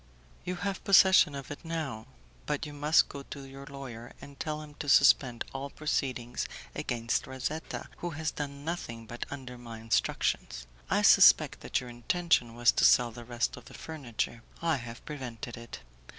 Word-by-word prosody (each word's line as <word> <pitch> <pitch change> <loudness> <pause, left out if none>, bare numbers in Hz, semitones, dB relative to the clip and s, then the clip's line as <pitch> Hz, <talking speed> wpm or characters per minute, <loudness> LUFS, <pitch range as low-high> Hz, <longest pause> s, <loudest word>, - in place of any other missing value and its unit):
"You 180 - -2
have 195 +2 -3
possession 190 -6 +6
of 140 0 -7
it 145 - -8
now. 155 -9 -4 0.4
But 150 +3 -1
you 150 - -8
must 150 +3 +4
go 140 - -8
to 140 0 -9
your 135 +1 -11
lawyer 125 -4 -8
and 140 0 -12
tell 155 -1 -3
him 150 -1 -12
to 145 - -3
suspend 130 -4 +5
all 135 +1 -4
proceedings 130 -5 -2 0.3
against 115 -1 -1
Razetta, 130 +5 -4
who 175 - -4
has 160 0 -3
done 140 -1 -6
nothing 115 -9 -4
but 120 +2 -6
under 125 -3 -8
my 115 -2 -8
instructions. 110 - 0 0.2
I - - +2
suspected - - +7
that - - -1
your 125 - -8
intention 120 -1 +1
was 120 0 +5
to - - 0
sell 120 -1 +6
the 120 +1 -10
rest 120 0 -1
of 125 - -12
the - - -12
furniture; 120 -6 -4 0.2
I 165 -3 +1
have 120 -1 -9
prevented 125 -4 -6
it. 115 - -9
135 Hz, 175 wpm, -30 LUFS, 120-150 Hz, 0.4 s, suspected